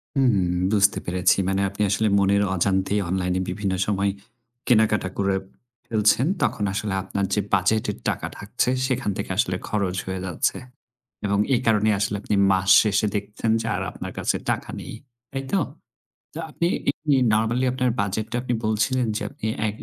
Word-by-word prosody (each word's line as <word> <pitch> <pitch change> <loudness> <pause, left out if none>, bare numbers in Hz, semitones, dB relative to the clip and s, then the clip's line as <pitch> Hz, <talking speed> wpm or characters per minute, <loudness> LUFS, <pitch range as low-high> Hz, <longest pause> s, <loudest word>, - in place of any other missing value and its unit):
উম, 100 -10 +2
বুঝতে 100 -1 +3
পেরেছি। 90 +2 +2
মানে 95 0 +1
আপনি 100 +2 -6
আসলে 105 +3 +1
মনের 100 +1 +3
অজান্তেই 95 +3 +1
অনলাইনে 90 0 0
বিভিন্ন 100 0 -2
সময় 100 -1 +1 0.6
কেনাকাটা 110 -5 +3
করে 100 -1 +1 0.5
ফেলছেন। 110 +5 +3 0.2
তখন 105 - 0
আসলে 100 0 -2
আপনার 100 +1 -2
যে 105 - +2
বাজেটের 100 +3 +2
টাকা - - -2
থাকছে। 115 +5 -1 0.2
সেখান 130 -4 -1
থেকে - - -4
আসলে - - +1
খরচ 100 -4 -1
হয়ে 95 -1 -3
যাচ্ছে। 90 -3 -1 0.7
এবং 100 0 +1
এই 125 - +2
কারণেই 110 -1 +3
আসলে 105 0 0
আপনি 105 - -1 0.2
মাস 95 0 +1
শেষে 105 0 +1
দেখছেন 105 +2 -2
যে - - -6
আর - - -2
আপনার - - -7
কাছে - - 0 0.2
টাকা - - -3
নেই। - - -8 0.4
তাই 135 0 -4
তো? 195 - +3 0.8
তো - - -6
আপনি 170 - -1 0.2
এমনি 145 -1 0 0.2
নরমালি 115 +4 +1
আপনার 125 -1 +1
বাজেটটা 110 +4 -2
আপনি 125 -1 -1
বলছিলেন। 110 +4 +1
যে - - -2
আপনি 140 -6 -6 0.2
এ - - +1
105 Hz, 165 wpm, -24 LUFS, 95-115 Hz, 0.8 s, বুঝতে